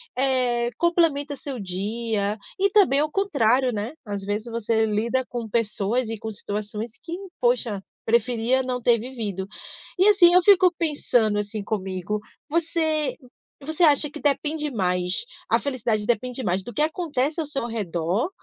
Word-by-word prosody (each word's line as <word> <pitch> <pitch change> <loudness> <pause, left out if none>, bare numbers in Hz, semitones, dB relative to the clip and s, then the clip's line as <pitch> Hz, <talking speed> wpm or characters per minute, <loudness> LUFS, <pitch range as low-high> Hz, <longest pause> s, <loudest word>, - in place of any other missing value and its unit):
eh, 250 -2 +1
complementa 325 -5 +2
seu 270 -2 -6
dia 205 +2 -2 0.2
e 395 +1 +4
também 380 -9 +4
ao 305 +1 0
contrário, 260 - +2
né? 215 +5 -3
Às 205 -2 -4
vezes 205 +3 -2
você 230 -1 0
lida 230 +5 0
com 235 -2 -5
pessoas 230 +2 0
e 225 -1 -5
com 220 - -5
situações 210 +2 -5
que 335 +1 -5 0.2
poxa, 240 -5 +1 0.2
preferia 235 +2 +2
não 255 -1 -2
ter 235 -1 +3
vivido. 215 -6 -5 0.5
E 375 +3 +5
assim 360 -4 +7
eu 365 - +7
fico 370 -2 +6
pensando 245 -9 +1
assim 205 0 -4
comigo, 195 0 -3 0.3
você 315 -2 0 0.4
você 315 +4 -5
acha 295 -2 +5
que 300 - -8
depende 300 +1 0
mais 180 - 0 0.2
a - - +4
felicidade 235 -6 -1
depende 245 +3 -1
mais 185 -1 0
do 240 - -7
que 255 - -1
acontece 310 -2 -1
ao 320 - 0
seu 275 -4 -2
redor 195 - -1
240 Hz, 155 wpm, -24 LUFS, 210-295 Hz, 0.5 s, assim